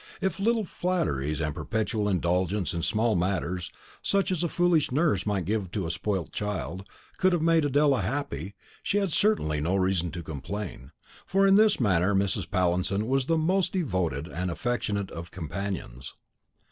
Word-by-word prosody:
If 190 -3 -1
little 225 +1 +2
flatteries, 75 - -1
and 75 -1 0
a - - -8
perpetual 105 - -1
indulgence 90 +1 0
in 85 - -2
all - - -4
small 110 +2 +1
matters, 90 0 -1 0.3
such 200 -1 +1
as 175 -2 0
a - - +2
foolish 175 -4 +2
nurse 140 - +1
might 100 -4 0
give 100 -1 -1
to 100 -4 -1
a 80 - -1
spoilt 95 -3 -2
child, 100 -2 -4 0.3
could 185 0 +3
have 175 - +1
made 165 -2 +4
Adela 145 -3 +3
happy, 100 - -3 0.3
she 205 - 0
had 195 -4 +1
certainly 115 - +2
no 85 +5 +1
reason 95 -2 +1
to 85 0 -5
complain, 75 -1 -6 0.4
for 195 +1 +3
in 195 - +6
this 215 +1 +5
manner 95 -3 +2
Mrs. 95 -1 0
Pallinson 95 +2 +1
was 135 +2 +1
the 165 - +2
most 180 +3 +1
devoted 90 - -1
and 90 +1 -3
affectionate 100 0 -2
of 85 +1 -7
companions. 85 -7 -5
100 Hz, 170 wpm, -27 LUFS, -, 0.4 s, in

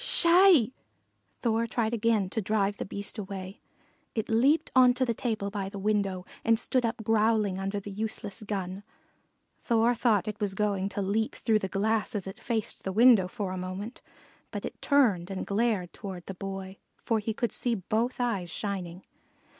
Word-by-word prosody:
"Sssh - - +1
hi!" 340 - +6 0.7
Thor 230 -1 +1
tried 225 0 -1
again 225 -3 +2
to 220 - -1
drive 205 0 0
the - - -4
Beast 200 +2 -6
away. 190 0 -7 0.5
It 220 0 -2
leaped 265 +8 +3
on 250 -1 +6
to 255 0 +1
the 235 - 0
table 215 -4 -2
by 195 -2 -3
the 200 - -8
window 195 -2 0 0.2
and 230 0 +4
stood 250 +2 0
up 230 0 -4
growling 215 -3 +2
under 195 +1 -2
the 200 +1 -8
useless 210 0 -4
gun. 195 -2 -4 0.8
Thor 230 0 +3
thought 215 -5 +2
it 210 0 -4
was 200 -3 -1
going 200 -1 0
to 200 0 -3
leap 215 +3 0
through 220 -1 +2
the 190 - -3
glass 215 +4 0
as 200 - -2
it 190 - -8
faced 225 -3 -3
the 190 - -2
window 225 -2 +6
a 185 -1 -4
moment; 185 +6 -6 0.5
but - - -5
it - - -8
turned 220 - +3
and 190 -1 -4
glared 200 -4 0
toward 190 -4 -7
the 195 - -6
Boy, 195 0 -6 0.3
for 225 -2 +1
he 215 +1 -2
could 235 - -1
see 240 -2 +1
both 225 +6 -1
eyes 205 -8 -1
shining. 185 -2 -4
210 Hz, 180 wpm, -28 LUFS, 195-230 Hz, 0.8 s, hi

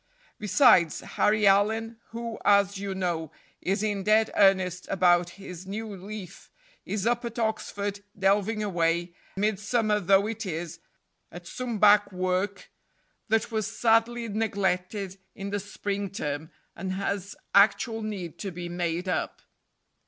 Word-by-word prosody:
Besides, 210 - +4
Harry 210 0 +1
Allyn, 220 +3 +3
who, 230 -1 -6
as 200 -1 +4
you 200 -1 -4
know, 170 -4 -2 0.3
is 195 +3 0
in 205 -2 -1
dead 215 +2 +3
earnest 185 -2 +3
about 175 -2 +3
his 185 -2 -9
"new 210 +1 -5
leaf," 195 -1 -9 0.4
is 205 -1 -2
up 240 +1 +1
at 235 -1 -6
Oxford 205 -3 -2 0.2
delving 205 +2 +2
away, 170 -2 0 0.2
midsummer 210 +1 +1
though 195 +1 +4
it 225 0 -4
is, 175 -2 -5 0.5
at 175 0 -10
some 245 +2 -4
back 205 0 +5
work 185 +2 -2 0.6
that 225 +1 +1
was 220 -2 -1
sadly 230 +1 +2
neglected 195 -2 -1 0.2
in 200 -1 -6
the 205 - -1
spring 200 0 -4
term, 150 -4 -4 0.3
and 185 +1 -4
has 200 0 -3 0.2
actual 215 +3 +4
need 190 -6 -5
to 200 - -4
be 175 -1 -6
made 175 +1 -2
up. 180 -3 -2
200 Hz, 135 wpm, -27 LUFS, 185-215 Hz, 0.6 s, back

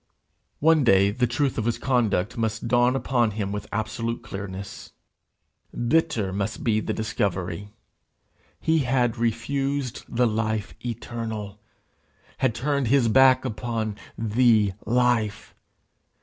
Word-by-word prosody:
One 160 -1 +5
day 100 -3 +5
the 125 +3 +1
truth 125 +2 0
of 110 - -2
his 120 - 0
conduct 120 -5 0
must 115 0 -2
dawn 120 +2 +3
upon 125 -4 +1
him 100 -2 -2
with 105 0 -5
absolute 115 +2 -3
clearness. 100 0 -7 0.9
Bitter 115 -9 +1
must 100 +2 -3
be 110 -2 +2
the - - -3
discovery. 100 -3 -2 0.9
He 160 0 +2
had 125 -3 +1
refused 135 +3 -1
the 125 +1 +2
life 110 -1 -1
eternal! 110 -3 -5 0.8
had 130 -4 +1
turned 140 +1 0
his 125 -1 +3
back 130 +2 +5
upon 110 -2 -3 0.2
The 110 -2 +3
Life! 120 -3 +1
115 Hz, 120 wpm, -25 LUFS, 105-125 Hz, 0.9 s, One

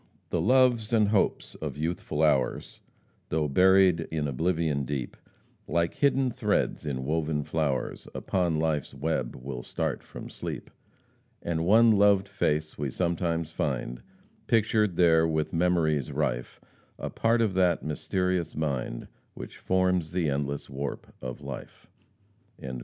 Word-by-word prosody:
"The - - +1
loves 125 -4 +3
and 110 -3 +3
hopes 105 -2 +1
of - - -6
youthful 80 -1 -2
hours, 70 -5 +1 0.5
Though 75 -1 0
buried 90 +1 +4
in 75 -2 -1
oblivion 80 0 0
deep, 65 -2 -4 0.5
Like 85 0 0
hidden 135 -2 +2
threads 80 - -1
in 65 -2 -3
woven 75 0 0
flowers, 70 -4 -2
Upon 85 -4 0
life's 75 -4 -1
web 70 -3 -2
will 65 -1 -6
start - - -3
from - - -10
sleep. - - -7 0.7
And 85 -1 -1
one 115 +3 +6
loved 100 -1 +4
face 75 -3 -1
we 70 -2 -1
sometimes 85 0 -1
find 60 -5 -3 0.5
Pictured 110 -4 +2
there 80 -2 +5
with 80 -1 -1
memories 80 -5 +1
rife 65 -4 -2 0.4
A - - -5
part 115 +1 +2
of 110 -4 +2
that 90 -2 +2
mysterious 90 +2 -1
mind 70 -6 -3 0.3
Which - - -9
forms 90 -3 +1
the 85 -4 +1
endless 70 0 -2
warp 70 +1 -6
of 65 -1 -6
life." - - -8
80 Hz, 130 wpm, -28 LUFS, 75-95 Hz, 0.7 s, one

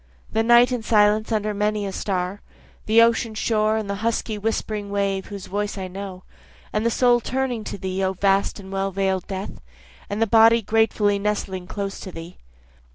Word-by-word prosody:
The 220 - +1
night 240 +2 +5
in 250 -2 -1
silence 215 0 +3
under 215 -1 0
many 210 0 -1
a 195 - -3
star, 190 0 -3 0.5
The 225 +2 +6
ocean 230 -1 +1
shore 215 0 +1
and 215 -2 -3
the 200 0 -3
husky 225 -1 -1
whispering 210 -1 -3
wave 200 -1 -1
whose 200 -2 -7
voice 205 +1 -3
I 190 -1 -4
know, 190 0 -8 0.5
And 215 - 0
the 230 - +2
soul 245 +1 +3
turning 250 -2 -2
to - - -5
thee 190 0 -3
O 190 0 +1
vast 195 +2 +1
and 190 -1 -10
well 195 0 -1
veil'd 190 -1 -1
death, 195 0 -6 0.5
And 205 - -3
the 225 - +3
body 225 +1 +5
gratefully 210 -1 +2
nestling 200 -3 -2
close 200 0 -4
to 185 - -8
thee. 165 +1 -10
205 Hz, 185 wpm, -23 LUFS, 195-220 Hz, 0.5 s, The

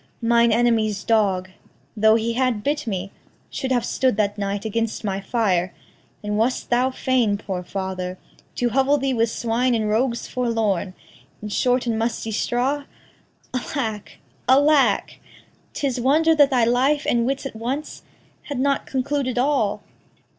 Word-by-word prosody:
Mine 235 0 +4
enemy's 220 -3 +1
dog, 195 -5 +1 0.4
Though 220 0 +5
he 230 +1 0
had 250 -4 0
bit 295 -2 -1
me, 195 -2 -3 0.4
should 265 -2 -3
have 245 -2 +1
stood 255 -5 +1
that 205 -1 +1
night 200 0 -3
Against 225 +1 -2
my 195 -2 -2
fire; 190 -6 0 0.5
and 210 0 -1
wast 245 +3 -1
thou 250 +2 +3
fain, 255 -5 +1
poor 190 -3 -4
father, 185 -1 -4 0.4
To 245 - 0
hovel 270 +4 +3
thee 270 -1 -1
with 230 -1 +1
swine 235 +2 0
and 220 -2 0
rogues 235 +3 0
forlorn, 220 -7 -1 0.5
In 210 - -4
short 250 +4 +1
and 225 -2 -1
musty 225 -1 -2
straw? 260 +6 -1 0.7
Alack, 240 -5 -4 0.3
alack! 285 +2 +3 0.6
'Tis 265 -4 -1
wonder 315 +6 +4
that 290 -3 +5
thy 245 -4 +3
life 265 +5 +2
and 235 0 +2
wits 275 +1 -2
at 270 - -6
once 255 +7 -4 0.4
Had 285 -3 -4
not 275 +1 0
concluded 265 -1 -1
all. 245 -6 +1
235 Hz, 145 wpm, -22 LUFS, 210-260 Hz, 0.7 s, Though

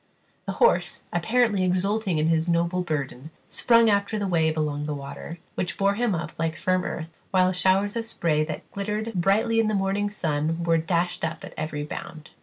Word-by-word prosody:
The - - -1
horse, 475 - +2
apparently 210 +3 +2
exulting 185 +1 +1
in 155 - +2
his 165 +1 +2
noble 170 +2 +1
burden, 145 -4 -3 0.2
sprung 230 -1 +4
after 200 0 +2
the 205 - -1
wave 160 -4 +1
along 150 -1 -1
the 150 - -2
water, 140 +4 -7 0.2
which 180 - -3
bore 200 0 +3
him 225 -2 0
up 165 - -4
like 165 -1 0
firm 185 0 +1
earth, 165 -1 -4 0.2
while 185 -1 +3
showers 190 +3 +2
of 230 -1 -2
spray 155 -8 +1
that 155 - -7
glittered 210 +3 -3
brightly 210 +5 +2
in 225 - +3
the 215 - +1
morning 195 +1 0
sun 165 -3 -1
were 165 -1 +3
dashed 170 +2 -1
up 160 0 -3
at - - -10
every 150 -1 -3
bound. 155 +1 -8
180 Hz, 190 wpm, -25 LUFS, 160-205 Hz, 0.2 s, sprung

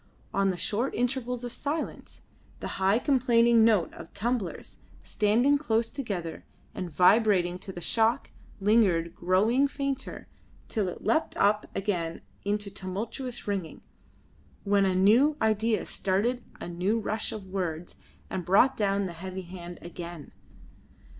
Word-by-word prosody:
On 195 0 +2
the 185 - -2
short 225 +9 -1
intervals 245 0 -1
of 245 - -4
silence, 295 +5 -5 0.4
the - - -4
high 195 +3 +4
complaining 235 -3 +4
note 215 -7 +3
of - - -11
tumblers, 230 -4 -3 0.3
standing 240 +7 +2
close 230 -5 +1
together 190 - -4 0.3
and 180 - -4
vibrating 180 0 +4
to 190 - -7
the 175 - -8
shock, 225 +5 +1 0.3
lingered, 195 -6 +3
growing 215 +10 +3
fainter, 275 -1 -4 0.4
till 210 -5 -1
it 180 - -6
leapt 320 - +1
up 210 +1 +2
again 175 -5 -2 0.2
into 205 0 -2
tumultuous 210 +7 -5
ringing, 195 -5 -3 0.8
when 200 -1 +3
a 190 -1 +1
new 235 +11 +5
idea 220 0 +1
started 225 +6 0 0.2
a - - -6
new 180 +6 0
rush 215 0 -2
of 210 -3 -7
words 180 -3 -4 0.3
and 185 - -4
brought 200 +10 +4
down 200 -1 +1
the 180 - -5
heavy 185 +2 -6
hand 175 -1 -9
again. 170 -2 -8
205 Hz, 135 wpm, -28 LUFS, 185-235 Hz, 0.8 s, new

